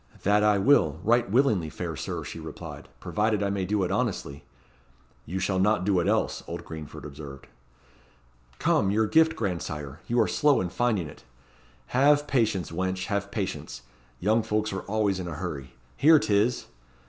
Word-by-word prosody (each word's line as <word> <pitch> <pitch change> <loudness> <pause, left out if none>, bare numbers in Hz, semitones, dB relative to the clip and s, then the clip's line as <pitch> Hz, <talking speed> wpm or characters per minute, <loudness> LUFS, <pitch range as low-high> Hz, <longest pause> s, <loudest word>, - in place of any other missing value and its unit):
"That 105 +1 +3
I 105 -1 +4
will, 95 - +3
right 120 +2 +3
willingly, 110 - +2
fair - - -5
Sir," - - -4
she - - -7
replied; - - -9
"provided 105 -1 0
I 100 - 0
may 100 -2 -1
do 100 +1 0
it 90 - -1
honestly." 70 +1 -2 0.8
"You 90 - -3
shall 95 0 0
not 95 -1 +2
do 95 -3 +3
it 85 - 0
else," - - 0
old - - -6
Greenford 80 -2 -8
observed. 70 -1 -9 1.1
"Come, 95 - +2
your 110 +2 +2
gift, 160 +7 +4
grandsire 75 - -4
you 120 +1 +1
are - - +4
slow 145 -2 +3
in 90 - -2
finding 110 -4 0
it." 70 - -13 0.7
"Have 145 +3 +4
patience, 110 - 0
wench, 95 +2 -2
have 100 -1 -2
patience. 95 - -4 0.4
Young 110 +4 +2
folks 110 -1 -1
are 95 - -3
always 100 -2 0
in 90 - -4
a 85 - -5
hurry. 75 -5 -6 0.2
Here 155 +2 +7
'tis!" 110 -1 +1
100 Hz, 170 wpm, -27 LUFS, 90-110 Hz, 1.1 s, Here